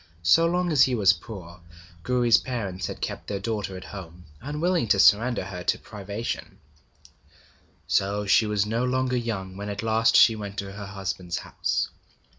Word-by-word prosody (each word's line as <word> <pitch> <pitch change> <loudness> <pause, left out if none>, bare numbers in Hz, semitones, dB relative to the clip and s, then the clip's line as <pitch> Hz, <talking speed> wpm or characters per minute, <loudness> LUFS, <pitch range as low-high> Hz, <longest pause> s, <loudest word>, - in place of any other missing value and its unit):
So 165 - +5
long 175 0 0
as 145 -4 +4
he 130 -2 +5
was 100 -4 +5
poor, 90 -2 -10 0.4
Gouri's 120 +1 +3
parents 100 -8 -4
had - - -7
kept - - -4
their 100 - -3
daughter 105 -3 -3
at 95 - -9
home, 90 -3 -10 0.2
unwilling 150 +2 0
to 100 - +3
surrender 115 +4 +4
her 90 -2 -7
to - - +2
privation; 105 +2 -6 1.3
so 100 +1 0
she 100 +3 +4
was 105 -1 +1
no 115 +3 -1
longer 130 0 0
young 105 -6 -3
when 100 +1 -5
at 100 +2 -4
last 115 0 +3
she 115 - +7
went 100 -1 -7
to 100 0 -4
her 100 0 -8
husband's 95 -3 -4
house. - - -2
105 Hz, 170 wpm, -25 LUFS, 95-120 Hz, 1.3 s, she